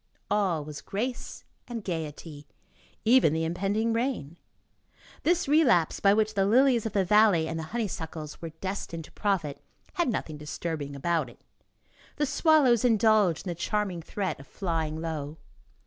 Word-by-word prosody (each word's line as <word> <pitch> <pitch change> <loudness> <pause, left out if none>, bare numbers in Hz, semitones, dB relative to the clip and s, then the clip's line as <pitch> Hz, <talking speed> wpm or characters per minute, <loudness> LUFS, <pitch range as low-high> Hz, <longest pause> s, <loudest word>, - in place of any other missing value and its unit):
All 185 -8 +1
was 150 -1 -8
grace 240 +5 -4 0.2
and 235 -4 -5
gayety, 155 -4 -6 0.6
even 230 - +5
the 160 0 0
impending 200 +7 0
rain; 230 - -2 0.8
this 345 0 +1
relapse, 275 - +3
by 200 - +5
which 215 +1 +2
the 195 -2 +2
lilies 245 0 +4
of 215 - -7
the 195 -2 +2
valley 205 -5 +4
and 160 0 -3
the 160 - -4
honeysuckles 160 -9 -5
were 165 - -5
destined 165 -1 -5
to - - -17
profit, 185 -9 -1 0.3
had 345 -6 0
nothing 160 -9 -3
disturbing 150 -1 -5
about 165 +3 0
it; - - -18 0.8
the 295 - +1
swallows 275 -6 +4
indulged 215 -7 +3
in - - -3
the - - -1
charming 185 0 -2
threat 190 +1 -3
of 140 - -13
flying 160 -4 -2
low. 155 -2 -4
190 Hz, 150 wpm, -28 LUFS, 160-225 Hz, 0.8 s, even